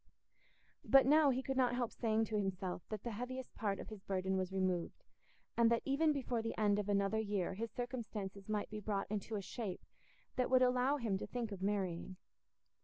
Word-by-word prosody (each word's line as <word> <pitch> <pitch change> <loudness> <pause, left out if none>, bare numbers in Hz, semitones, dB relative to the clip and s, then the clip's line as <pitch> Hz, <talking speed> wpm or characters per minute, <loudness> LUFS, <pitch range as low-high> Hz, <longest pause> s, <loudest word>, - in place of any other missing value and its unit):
But 270 -1 +7
now 300 +1 +6
he 260 0 0
could 270 0 -2
not 250 -2 +3
help 245 -2 -1
saying 225 -1 +1
to 215 - -4
himself 190 -3 -1
that 215 -2 -4
the 235 - -3
heaviest 250 +4 -5
part 200 -3 -1
of - - -7
his 215 -3 -8
burden 190 0 -1
was 185 -1 -1
removed, 185 - -1 0.5
and 235 -1 +5
that 235 0 +2
even 300 +3 +3
before 255 -5 -1
the 225 - -4
end 210 -1 +3
of 205 0 -2
another 200 +2 +2
year 205 -4 -1
his 225 +4 -3
circumstances 215 -5 -5
might 210 -1 -1
be 215 - -4
brought 200 -1 -1
into 215 +1 -2
a 200 - -3
shape 200 -1 -5 0.5
that 250 - +2
would 255 0 +6
allow 255 +3 +3
him 215 -7 -1
to - - -5
think 235 -3 -3
of 195 -2 -6
marrying. 190 -3 -1
215 Hz, 200 wpm, -37 LUFS, 195-245 Hz, 0.5 s, But